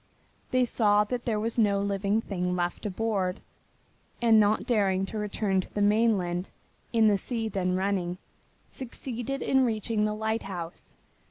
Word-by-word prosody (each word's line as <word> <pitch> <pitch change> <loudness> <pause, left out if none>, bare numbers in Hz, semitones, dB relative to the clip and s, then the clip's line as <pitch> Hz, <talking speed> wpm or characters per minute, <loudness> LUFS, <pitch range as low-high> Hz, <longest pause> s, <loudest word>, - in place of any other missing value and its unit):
They 255 0 +3
saw 210 -3 +3
there 235 0 -2
was 230 +2 -1
no 200 -3 +3
living 200 +2 0
thing 180 -4 -2
left 175 +4 -2
aboard, 195 -2 -1 0.8
and 230 -2 +5
not 210 +1 +3
daring 195 -5 +2
to 215 +2 -5
return 205 -2 0
to - - -13
the 205 - -2
mainland 205 -4 +2 0.4
in 225 -2 +4
the 205 -2 +3
sea 225 +1 -2
then 185 -3 -1
running 185 -2 -1 0.5
succeeded 260 +1 -5
in 265 0 +3
reaching 220 -2 0
the 210 0 -1
lighthouse. 195 -6 -4
210 Hz, 145 wpm, -28 LUFS, 190-225 Hz, 0.8 s, and